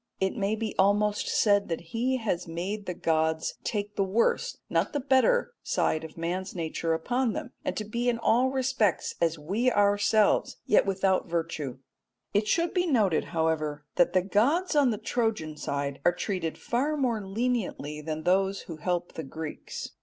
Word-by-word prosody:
It 190 +3 0
may 205 -1 0
be 220 -1 -3
almost 205 +2 +3
said 205 -3 +3
that 165 - -1
he 255 +3 +1
has 190 -8 -2
made 185 +5 -4
the 180 - -3
gods 160 -1 0
take 205 -1 -3
the 195 - +2
worse, 230 - +1
not - - 0
the 290 - 0
better, 285 - +3
side 155 - 0
of 160 0 -10
man's 180 +4 -3
nature 165 -1 -1
upon 245 +7 0
them, - - -5
and - - -2
to 215 - -2
be 235 +3 -1
in 235 - +1
all 240 +3 +3
respects 260 -7 +1
as 165 -1 +2
we 200 +12 0
ourselves 205 0 +3
yet 210 - +4
without 190 -1 +1
virtue. 165 -6 -3 0.6
It 210 +1 +2
should 335 +8 +1
be 360 -1 +1
noted, 210 - +2
however, 155 -3 -1
that 175 - +3
the 185 -1 +3
gods 280 - +2
on 285 -3 +5
the 220 - -1
Trojan 215 -11 -1
side 140 -1 -3
are 175 - +5
treated 180 -4 -2
far 285 +6 -1
more 240 -6 0
leniently 195 - -2
than 155 0 -4
those 195 +2 +2
who 165 - -8
help 175 +2 -2
the - - -5
Greeks. 155 +2 -6
200 Hz, 175 wpm, -28 LUFS, 165-235 Hz, 0.6 s, on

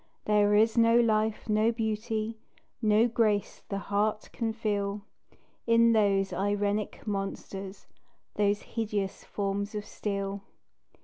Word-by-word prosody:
There 210 -1 +4
is 220 +2 +4
no 230 +1 +5
life, 220 -1 +1
no 215 +1 +3
beauty, 220 0 -2 0.4
No 215 +1 +4
grace 220 -3 0
the 200 - -2
heart 205 +2 -1
can 230 -2 -1
feel, 205 -2 -2 0.6
In 230 0 +5
those 200 -3 +2
irenic 205 +1 -1
monsters 195 -1 -5 0.5
Those 205 0 +1
hideous 210 -4 -3
forms 200 +1 -3
of 210 -1 -4
steel. 200 -2 -4
210 Hz, 115 wpm, -29 LUFS, 200-220 Hz, 0.6 s, no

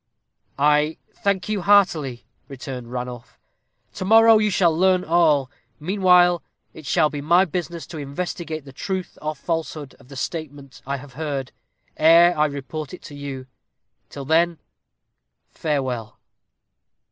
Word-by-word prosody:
"I 150 +2 +2 0.2
thank 195 -3 -1
you 210 -2 -1
heartily," 170 -10 +2 0.2
returned 125 -3 -8
Ranulph. 125 -1 -7 0.6
"To - - -5
morrow 225 +2 +6
you 215 0 +2
shall 175 -4 +2
learn 185 +1 +3
all. 155 -5 +2 0.3
Meanwhile, 180 0 +4 0.3
it 155 -3 -11
shall 155 -2 +2
be 145 - -5
my 170 +6 +4
business 170 -1 -5
to 160 - -8
investigate 155 +1 -5
the 135 - -12
truth 190 +5 -5
or 155 0 -3
falsehood 155 -2 -4
of - - -19
the 135 - -12
statement 145 -2 -6
I 140 0 -2
have 135 -1 -13
heard, 140 -2 -4 0.5
ere 170 +2 +6
I 150 0 +2
report 145 +3 -6
it - - -18
to 145 - -10
you. 140 -2 -7 0.6
Till 140 -1 -8
then, 165 +3 +2 0.9
farewell." 130 -8 -3
155 Hz, 135 wpm, -22 LUFS, 140-175 Hz, 0.9 s, morrow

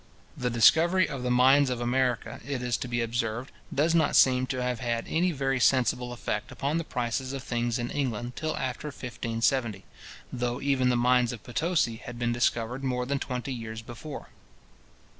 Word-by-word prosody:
The 125 - -1
discovery 165 +10 +5
of 135 -3 -5
the 125 - -1
mines 130 +3 +5
of 125 -2 -2
America, 120 -1 0
it 130 -1 -4
is 125 -1 0
to - - -5
be 120 -1 -1
observed, 115 +2 -2 0.2
does 155 +4 +2
not 160 -3 +3
seem 130 -1 +5
to 130 -1 -2
have 125 -2 -1
had 120 -2 -2
any 175 +3 +1
very 135 -3 0
sensible 125 -1 +2
effect 105 -3 -4
upon 145 +4 -1
the - - -2
prices 130 -1 -2
of 135 -2 -5
things 120 -1 -1
in 120 0 -3
England 120 -3 -2
till 155 0 -2
after 130 +3 -3
1570; 115 -4 -2 0.5
though 125 0 -2
even 135 -2 +2
the 125 - +2
mines 125 0 +3
of 115 -4 -8
Potosi 150 -3 0
had 120 +1 -9
been 120 0 0
discovered 120 +1 0
more 125 -2 -1
than 140 +2 -1
twenty 125 +1 -4
years 110 -2 -6
before. 120 +6 -8
125 Hz, 180 wpm, -28 LUFS, 120-135 Hz, 0.5 s, discovery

